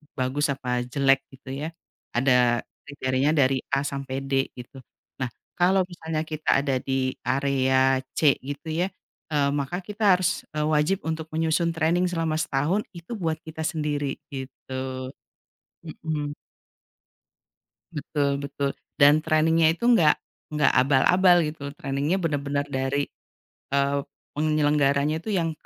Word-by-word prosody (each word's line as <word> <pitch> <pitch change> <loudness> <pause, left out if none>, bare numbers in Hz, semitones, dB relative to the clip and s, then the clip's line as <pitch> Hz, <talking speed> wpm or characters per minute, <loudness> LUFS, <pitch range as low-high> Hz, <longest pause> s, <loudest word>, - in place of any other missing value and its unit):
bagus 135 +3 0
apa 125 -2 -2
jelek, 135 +1 +2
gitu, 135 0 -13 0.2
ya. - - -3 0.5
Ada 125 -2 +3 0.2
kriteria 135 +1 0
dari 135 -2 +3 0.2
A 140 - +1
sampai 135 -1 -4
D, 135 0 +1
gitu. 125 +2 -10 0.4
Nah, 130 - 0 0.3
kalau 190 +2 +4
misalnya 160 -3 -4
kita 155 -3 +1
ada 135 -3 +1
di 130 0 -1
area 130 -1 +2 0.2
C, 145 -3 +4
gitu, 145 +4 -7
ya, 175 +4 +1 0.5
eee, 140 -1 +3
maka 145 +6 -2
kita 205 0 +2
harus, 180 -1 -1
eee, 150 - 0
wajib 155 +6 +2
untuk 160 -1 -3
menyusun 165 +1 +1
training 165 +3 +2
selama 165 -3 -1
setahun, 155 +8 0
itu 170 +5 -11
buat 160 -2 -1
kita 160 0 -5
sendiri, 145 -3 -2
gitu. 130 -1 -6 0.8
Mhm. 150 -2 -4 1.6
Betul, 140 -1 0
betul. 140 0 -2 0.2
Dan 145 +2 +6
training-nya 160 0 +3
itu 235 - -7
enggak 160 -10 +6 0.4
nggak 150 -1 +3
abal-abal, 175 +8 +5
gitu. 145 -2 -6
Training-nya 140 +6 0
bener-bener 145 -2 -1
dari, 135 +2 0 0.7
eee, 140 0 +2 0.4
penyelenggaranya 150 0 +2
itu 220 - -10
yang 165 -4 +1
145 Hz, 130 wpm, -25 LUFS, 135-160 Hz, 1.6 s, Dan